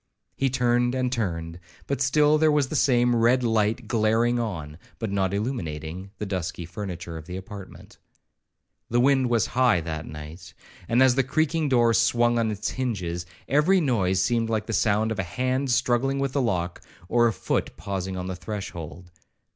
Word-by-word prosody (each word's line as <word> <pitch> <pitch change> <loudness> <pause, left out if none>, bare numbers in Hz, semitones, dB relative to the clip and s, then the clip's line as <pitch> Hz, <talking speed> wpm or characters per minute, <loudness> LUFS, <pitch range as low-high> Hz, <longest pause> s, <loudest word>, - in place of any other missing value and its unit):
He 135 - +1
turned 120 -1 +1
and 130 -1 0
turned, 85 -8 -3 0.3
but 140 -2 -2
still 150 +3 +4
there 155 0 +4
was 145 -3 +2
the - - -4
same 120 -2 +3
red 120 +2 +3
light 110 0 +1
glaring 115 +1 +2
on, 85 -9 -4 0.2
but 110 -4 -4
not 95 -2 0
illuminating, 95 - -4
the 105 - -4
dusky 90 -3 -4
furniture 85 -3 -6
of 80 - -10
the 90 0 -5
apartment. 95 0 -11 0.9
The 120 - +2
wind 130 0 +3
was 115 -2 +2
high 125 -6 +4
that 80 -1 -5
night, 80 +3 -10 0.3
and 120 +3 +5
as 130 -1 +5
the 135 +1 +2
creaking 155 +3 0
door 120 -3 +4
swung 120 +1 +3
on 115 -1 +1
its 105 0 -3
hinges, 90 -9 -3 0.2
every 150 +8 +4
noise 100 - +1
seemed 115 +3 +1
like 110 -2 -1
the 115 - -4
sound 110 +1 +2
of 110 - -3
a - - +1
hand 130 +8 -1
struggling 130 +2 +1
with 135 -1 -1
the 140 - 0
lock, 90 -7 -1 0.3
or 120 +3 +4
of 110 - -1
a - - -18
foot - - -2
pausing 95 -1 -4
on 90 - -4
the 95 0 -4
threshold. 90 -3 -7
115 Hz, 180 wpm, -25 LUFS, 95-125 Hz, 0.9 s, and